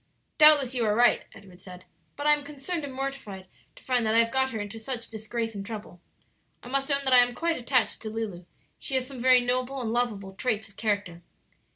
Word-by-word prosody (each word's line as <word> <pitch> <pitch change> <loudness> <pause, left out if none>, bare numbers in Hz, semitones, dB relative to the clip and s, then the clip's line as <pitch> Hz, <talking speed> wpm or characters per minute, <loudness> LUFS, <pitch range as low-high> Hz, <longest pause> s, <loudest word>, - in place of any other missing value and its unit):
"Doubtless 295 -4 +7
you 245 -2 0
are 210 -1 +1
right," 240 +2 +3
Edward 185 -3 -15
said; 180 -1 -12 0.3
"but 290 - -6
I 300 - +6
am 295 -1 -1
concerned 295 +3 -5
and 285 - -5
mortified 260 -8 -5 0.3
to - - -17
find 250 -2 +1
that 220 0 +1
I - - +5
have 230 - -5
got 265 +1 +1
her 225 -4 -5
into 205 +2 -6
such 235 0 -4
disgrace 225 +1 -4
and 200 -1 -6
trouble. 205 -4 -9 0.6
I 245 - -10
must 275 +1 -1
own 280 -1 +1
I 255 -1 +7
am 245 0 +3
quite 335 +3 0
attached 250 -1 0
to 220 - -5
Lulu; 215 -5 -5 0.3
she 270 - -2
has 260 -1 +1
some 260 -2 -9
very 255 0 +6
noble 255 +2 -1
and 230 -3 -2
lovable 210 -6 -2
traits 220 0 -2
of 200 - -21
character." 200 -6 -2
240 Hz, 220 wpm, -27 LUFS, 215-265 Hz, 0.6 s, Doubtless